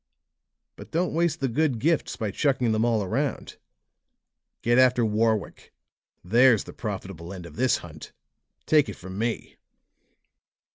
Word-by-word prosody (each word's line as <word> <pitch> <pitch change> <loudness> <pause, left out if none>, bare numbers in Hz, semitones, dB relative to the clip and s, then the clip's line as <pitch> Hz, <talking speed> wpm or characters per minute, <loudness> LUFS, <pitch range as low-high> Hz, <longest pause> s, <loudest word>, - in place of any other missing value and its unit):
But - - -11
don't 175 +2 -1
waste 170 -2 0
the 135 - +1
good 135 +1 0
gifts 160 +7 0
by 110 -3 -3
chucking 130 -1 +1
them 110 0 +1
all 115 -3 +1
around. 95 - -3 1.1
Get 120 +2 +3
after 125 -2 +4
Warwick; 110 0 -1 0.5
there's 115 +4 +4
the - - -11
profitable 95 -5 -6
end 90 -3 -8
of - - -12
this 130 +2 +2
hunt; 80 -2 -11 0.5
take 150 -2 +3
it - - -6
from 95 +2 -8
me!" 115 +1 -3
115 Hz, 140 wpm, -25 LUFS, 100-130 Hz, 1.1 s, after